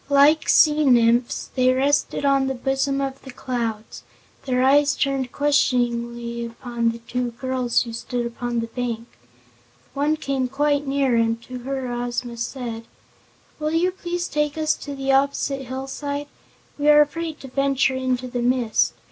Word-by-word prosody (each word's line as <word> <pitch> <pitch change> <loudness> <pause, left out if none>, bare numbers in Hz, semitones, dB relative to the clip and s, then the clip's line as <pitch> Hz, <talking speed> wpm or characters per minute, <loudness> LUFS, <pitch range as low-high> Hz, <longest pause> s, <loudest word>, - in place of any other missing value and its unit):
Like 290 +3 +5
sea 305 0 +5
nymphs 240 -2 +3
they 255 -1 +3
rested 280 +2 +1
on 275 -1 +3
the 265 - -2
bosom 270 +2 0
of 270 0 -4
the 265 - -12
clouds, 235 -4 -4 0.5
their 255 -1 +2
eyes 280 +1 +4
turned 270 -3 -1
questioningly 240 -4 0
upon 235 0 -2
the 230 - -4
two 245 +1 -3
girls 255 0 0
who 230 -2 -8
stood 240 +1 -3
upon 235 0 -3
the - - -2
bank. 230 -1 -4 0.9
One 295 +3 +1
came 275 -4 -1
quite 285 +2 0
near 270 -2 +1
and 230 0 +1
to 255 0 -7
her 260 0 -4
Ozma 240 0 -3
said: 230 -1 -5 0.7
"Will 305 +1 -1
you 350 +3 +2
please 350 -1 -4
take 300 0 -1
us 310 -1 +2
to 285 -1 -7
the 270 0 -1
opposite 275 0 +1
hillside? 275 +3 -4 0.5
We 295 +1 +3
are 300 0 +8
afraid 320 +1 -2
to 270 - -8
venture 275 0 +1
into 255 -1 -1
the 245 0 -3
mist. 245 -2 +2
260 Hz, 155 wpm, -23 LUFS, 240-280 Hz, 0.9 s, are